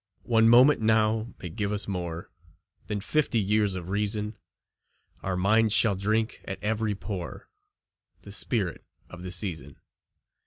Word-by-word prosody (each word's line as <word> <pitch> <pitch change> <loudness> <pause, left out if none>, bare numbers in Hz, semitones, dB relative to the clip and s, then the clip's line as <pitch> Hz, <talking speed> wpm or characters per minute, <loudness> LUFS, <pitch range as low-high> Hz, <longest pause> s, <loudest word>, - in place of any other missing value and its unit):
One 115 -1 +4
moment 125 +3 +6
now 110 +1 +2
may 90 - -6
give 100 +5 -3
us 105 -1 -1
more 85 -3 -5 0.6
Than 105 -1 -3
fifty 140 +3 0
years 105 -1 +2
of 90 -1 -6
reason; 105 +1 0 0.9
Our 95 -1 -2
minds 110 +3 +3
shall 110 -3 +4
drink 110 +4 -1
at 95 - -5
every 110 0 0
pore 95 -3 -7 0.7
The 100 - -10
spirit 100 -3 -2 0.3
of 90 - -10
the 90 0 -6
season. 80 -7 -3
105 Hz, 140 wpm, -27 LUFS, 95-110 Hz, 0.9 s, moment